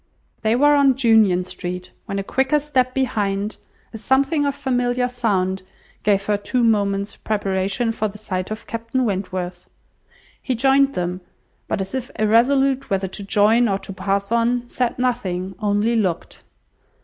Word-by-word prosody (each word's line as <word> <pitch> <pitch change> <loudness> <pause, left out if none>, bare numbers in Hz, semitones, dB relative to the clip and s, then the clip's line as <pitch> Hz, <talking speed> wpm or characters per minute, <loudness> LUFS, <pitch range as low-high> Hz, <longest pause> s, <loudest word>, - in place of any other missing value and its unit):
They 220 +1 +2
were 290 +3 +5
on 280 -2 +4
Union 220 -8 +4
Street, 180 0 -6 0.2
when 195 - -3
a 195 - -2
quicker 265 +7 +1
step 260 -4 0
behind, 210 -5 -1 0.4
a 225 - -7
something 275 +5 +2
of 280 - -1
familiar 250 -3 0
sound, 195 -7 -1 0.4
gave 200 -1 +2
her 210 0 +1
two 240 +4 -1
moments' 200 -2 +1
preparation 200 +2 -1
for 220 -1 -1
the 210 0 -9
sight 185 -3 -4
of 215 +1 -6
Captain 230 +3 -2
Wentworth. 185 -3 -4 0.7
He 255 - -1
joined 270 +3 +3
them; 180 +1 -2 0.5
but, - - -1
as 190 +4 -6
if 260 -2 -3
irresolute 265 +5 +3
whether 195 -1 0
to 200 - -6
join 215 +4 +3
or 195 - +1
to 195 0 -8
pass 195 +2 -2
on, 240 +1 +1
said 245 0 -1
nothing, 195 -7 -1
only 210 +2 +1
looked. 190 -7 -2
220 Hz, 155 wpm, -21 LUFS, 195-250 Hz, 0.7 s, were